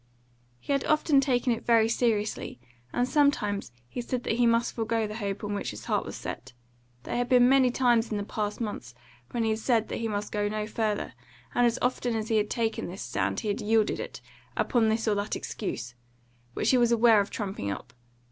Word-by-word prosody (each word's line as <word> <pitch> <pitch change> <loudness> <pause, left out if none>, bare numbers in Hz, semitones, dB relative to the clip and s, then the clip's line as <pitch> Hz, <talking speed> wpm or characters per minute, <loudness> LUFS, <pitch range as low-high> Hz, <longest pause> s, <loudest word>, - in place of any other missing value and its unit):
He 285 - -2
had 275 - +1
often 305 -2 +4
taken 250 -2 +2
it 230 - -5
very 230 -2 +4
seriously, 220 - -1 0.3
and 245 +1 +1
sometimes 255 - +1 0.2
he 245 - -5
said 245 +1 -3
that 225 - -1
he 240 -1 +4
must 230 +1 +2
forego 225 -1 0
the 210 +1 -5
hope 200 -2 -3
on 205 0 -2
which 200 - -2
his 105 - -8
heart - - 0
was - - -6
set. 125 +2 -7 0.5
There - - -4
had 245 0 0
been 250 -1 +6
many 265 -1 +5
times 240 -2 +2
in 215 - -2
the 205 - -2
past 210 0 -3
months 165 - -5 0.3
when 235 - -1
he 220 - +1
had 220 - -1
said 225 -1 +1
that - - -3
he 230 - -2
must 205 -1 -3
go 205 -1 0
no 215 0 -2
further, 215 -1 -2 0.4
and 245 0 +4
as 235 +1 0
often 245 -1 0
as 220 -1 -3
he 220 - +3
had 210 0 +1
taken 225 -2 -1
this 185 +2 -6
stand 100 -6 -1
he 215 - -3
had 205 - -1
yielded 220 0 +2
it, - - -6 0.4
upon 230 -3 +2
this 225 +1 0
or 215 - +3
that 205 +1 -2
excuse, 125 - -5 0.6
which - - +2
he 255 - +4
was 240 -1 +3
aware 230 -2 +6
of 200 - -4
trumping 195 - -4
up. 100 - -6
225 Hz, 220 wpm, -28 LUFS, 205-240 Hz, 0.6 s, been